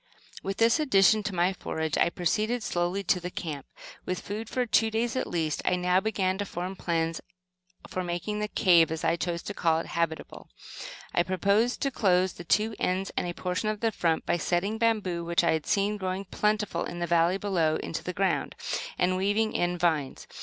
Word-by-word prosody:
With 195 0 -4
this 230 +6 +4
addition 215 - +4
to 205 -2 -4
my 180 +2 +2
forage, 160 -4 -3
I - - +3
proceeded 215 +8 0
slowly 175 +2 -1
to 180 - +2
the 180 0 -5
camp. 150 -6 -6 0.4
With 185 0 -3
food 215 +2 -5
for 255 -1 0
two 225 -1 +3
days 225 +2 -1
at 255 - -1
least, 160 -3 -1
I 180 - +2
now 180 +1 +2
began 190 -2 -1
to 205 - -1
form 180 +2 -4
plans 165 -2 -1 0.7
for 185 - -3
making 175 +4 -3
the 210 - -1
"cave," 170 -6 +4
as 160 0 -3
I 165 0 +2
chose 170 0 -3
to 205 - -5
call 165 -4 +2
it, 165 - -3
habitable. 165 -1 -3 0.6
I - - +3
proposed 200 +6 +1
to 275 - +1
close 185 -5 +2
the 175 - -9
two 215 +5 +1
ends 190 +2 -1
and - - -1
a 175 - -3
portion 185 +4 -2
of 215 -1 -3
the 225 -1 +2
front, 165 -5 0
by 175 - +1
setting 190 +6 -1
bamboo, 210 -7 +1
which 170 +1 +1
I 170 - +3
had 160 -2 -1
seen 205 +1 +1
growing 190 0 -3
plentifully 210 +2 -1
in 175 - -7
the 175 - -1
valley 170 +2 +3
below, 175 -6 +1
into 165 - -4
the 180 - -3
ground, 195 +2 0 0.4
and 185 +1 +2
weaving 205 +3 +1
in 175 0 0
vines. 160 -6 0
185 Hz, 205 wpm, -28 LUFS, 170-210 Hz, 0.7 s, this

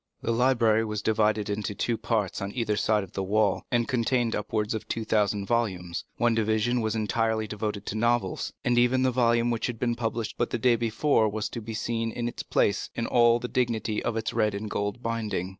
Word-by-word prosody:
The 115 - 0
library 115 -2 +3
was 105 -1 -3
divided 110 -1 +2
into 105 0 -3
two 120 - 0
parts 110 -5 -1
on 100 0 -3
either 115 -4 0
side 105 0 +1
of 95 - -11
the 95 - -3
wall, 105 +2 +1
and 120 -1 +1
contained 120 -1 +1
upwards 105 +1 -1
of 110 - -5
two 115 -1 -3
thousand 105 -2 +1
volumes; 95 -7 -1
one 120 -1 +3
division 110 +2 +1
was 110 0 -1
entirely 110 0 0
devoted 105 -1 -4
to - - -4
novels, 115 -4 0
and 120 0 +3
even 125 +2 +3
the 130 - +3
volume 120 -1 +2
which 115 - -1
had 120 -2 -4
been 120 +1 0
published 115 -1 -3
but 120 - +1
the - - -1
day 120 +1 +3
before 115 0 +2
was 110 +1 -3
to 115 - -6
be 110 +1 -6
seen 115 0 -2
in 120 +1 -3
its 120 - -5
place 100 - 0
in 115 - -1
all 120 -1 +4
the 125 - -4
dignity 115 -4 -1
of 115 - -2
its 110 - -2
red 105 -1 +1
and 105 +1 -5
gold 105 +4 -2
binding. 110 -5 -2
110 Hz, 215 wpm, -27 LUFS, 105-120 Hz, -, all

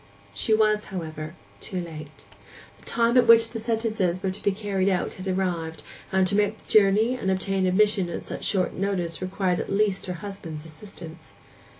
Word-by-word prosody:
She 100 - -1
was, 215 -1 +2
however, 160 -3 -6 0.2
too 185 - -4
late. 155 -3 -9 0.5
The - - -20
time 235 +1 +2
at 245 -2 +5
which 230 0 +7
the 230 - -4
sentences 220 -5 -1
were 190 - 0
to 190 - -8
be 200 - +2
carried 195 -1 0
out 185 -2 0
had 185 +1 -8
arrived, 175 -4 -2 0.3
and 190 0 +3
to 185 - +2
make 210 0 +2
the - - -23
journey 215 +3 +5
and 235 -7 -2
obtain 190 0 0
admission 195 -1 +3
at 170 - -5
such - - -7
short 190 -3 +1
notice 185 -4 -2
required 185 -1 0
at - - -4
least 195 -1 +1
her 180 - -2
husband's 165 -6 -7
assistance. 160 - -12
190 Hz, 185 wpm, -25 LUFS, 175-210 Hz, 0.5 s, which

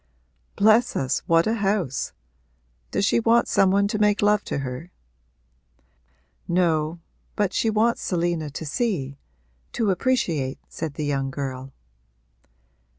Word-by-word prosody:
'Bless 220 +4 +4
us, 130 -1 0
what 165 0 +4
a 220 - +1
house! 195 - -1 0.8
Does 200 - 0
she 235 - +3
want 230 +1 +3
some 195 - +3
one 200 +1 +3
to 215 - -2
make 210 -1 +2
love 210 0 +3
to - - -3
her?' 135 +5 -5 1.6
'No, 165 -2 +1 0.4
but 205 -2 0
she 225 - +1
wants 220 +2 +1
Selina 170 -3 -1
to 155 +3 -7
see 145 - -2 0.5
to 220 -4 +1
appreciate,' 175 - 0
said 155 -3 -6
the 150 - -3
young 135 -2 -1
girl. 135 -1 -5
175 Hz, 130 wpm, -24 LUFS, 145-210 Hz, 1.6 s, Bless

